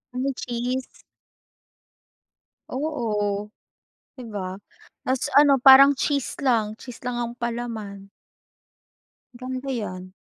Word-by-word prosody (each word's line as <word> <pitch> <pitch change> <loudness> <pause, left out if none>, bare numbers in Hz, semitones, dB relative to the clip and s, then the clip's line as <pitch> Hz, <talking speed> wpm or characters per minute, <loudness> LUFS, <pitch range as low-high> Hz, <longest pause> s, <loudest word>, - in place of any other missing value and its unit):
Ay, 265 +2 0
cheese. 250 +2 -4 1.7
Oo, 210 -8 -2 0.7
'di 245 - -8
ba 195 -3 -5 0.5
mas 260 0 0
ano 290 -1 +6
parang 275 +1 +9
cheese 280 0 -1
lang, 220 -5 +1
cheese 245 -1 -10
lang 245 -1 -3
ang 235 0 -3
palaman. 225 -5 -5 1.2
Ganda 255 +2 -6
yan. 185 -6 -5
240 Hz, 95 wpm, -24 LUFS, 210-260 Hz, 1.7 s, parang